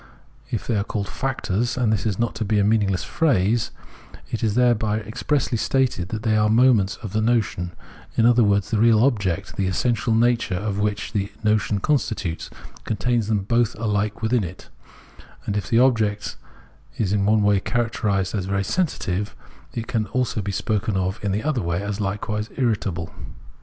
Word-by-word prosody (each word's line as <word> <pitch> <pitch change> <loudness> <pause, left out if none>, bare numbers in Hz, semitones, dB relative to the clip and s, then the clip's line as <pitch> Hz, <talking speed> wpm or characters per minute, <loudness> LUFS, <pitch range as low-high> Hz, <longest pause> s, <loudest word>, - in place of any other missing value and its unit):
If 115 -5 -3
they 115 - 0
are 100 - +1
called 100 -2 -3
factors, 120 +1 -2
and 115 -4 +2
this 110 - 0
is 100 -4 -1
not 120 0 0
to - - +3
be 105 0 +1
a 100 - +4
meaningless 100 -3 +2
phrase, 115 - +1 0.6
it 115 - -3
is 110 -2 +1
there 125 -1 +5
by 110 -1 -1
expressly 125 +2 -1
stated 125 -11 0
that 110 0 -4
they 110 -2 +2
are 105 0 +3
moments 115 -4 +4
of 105 - -6
the 110 - +1
notion; 110 -6 0 0.5
in 115 - +4
other 120 0 +5
words, 100 -1 +2
the 110 - +1
real 115 0 +5
object, 100 -8 0
the 95 - +1
essential 110 +3 +1
nature 115 -4 +2
of 100 +2 -2
which 105 +2 -1
this 100 -2 -1
notion 105 -1 +2
constitutes, 100 - -1 0.3
contains 110 +2 0
them 105 -3 0
both 115 +2 +1
alike 105 0 -1
within 115 0 +2
it, 90 +1 -8 0.8
and 100 - -2
if 105 - -2
the 115 - +3
object 110 -5 +2 0.6
is 100 -3 0
in 100 -1 +2
one 105 0 +4
way 100 -1 +4
characterised 105 -4 -1
as 100 -4 -1
very 100 0 0
sensitive, 105 - -1 0.4
it 115 - -3
can 110 -2 -1
be - - -14
also 125 -3 -1
spoken 105 0 -1
of 95 +1 -2
in 100 - 0
the 105 +3 -1
other 150 -6 0
way 85 -1 -1
as 100 +1 -3
Ukewise 105 +2 -2
irritable. 100 -9 -1
105 Hz, 185 wpm, -23 LUFS, 100-115 Hz, 0.8 s, there